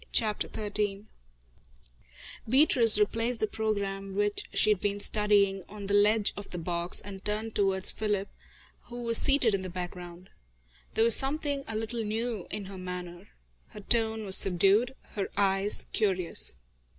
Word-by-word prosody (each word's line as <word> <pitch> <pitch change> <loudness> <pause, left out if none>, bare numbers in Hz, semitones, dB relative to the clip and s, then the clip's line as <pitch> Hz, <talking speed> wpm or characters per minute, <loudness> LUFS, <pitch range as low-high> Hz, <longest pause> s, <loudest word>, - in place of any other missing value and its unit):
CHAPTER 215 -3 -1
XIII 205 -1 -3 1.4
Beatrice 250 -5 +6
replaced 225 +3 0
the - - +1
programme 200 -3 -4
which 205 0 -1
she 215 - +3
had 200 -3 0
been 205 -1 -2
studying, 200 -2 +2
on 205 0 -9
the 200 - -3
ledge 210 +1 +3
of 205 - -9
the 180 - -7
box, 170 +1 -3
and 195 -1 -10
turned 215 +1 -3
towards 190 -2 +2
Philip, 205 -2 -2 0.6
who 240 0 -8
was 230 -1 +6
seated 275 -6 +4
in 195 - -1
the 185 - -6
background. 180 0 -8 0.6
There 225 - +3
was 230 -1 +6
something 285 0 -1
a 225 - -5
little 225 +1 -3
new 220 -2 -4
in 205 -1 -6
her 190 -1 -10
manner. 180 -1 -8 0.4
Her 210 - -12
tone 220 0 0
was 190 -1 +5
subdued, 195 +7 +2
her 200 -2 -4
eyes 195 0 0
curious. 180 - 0
205 Hz, 150 wpm, -28 LUFS, 195-220 Hz, 1.4 s, Beatrice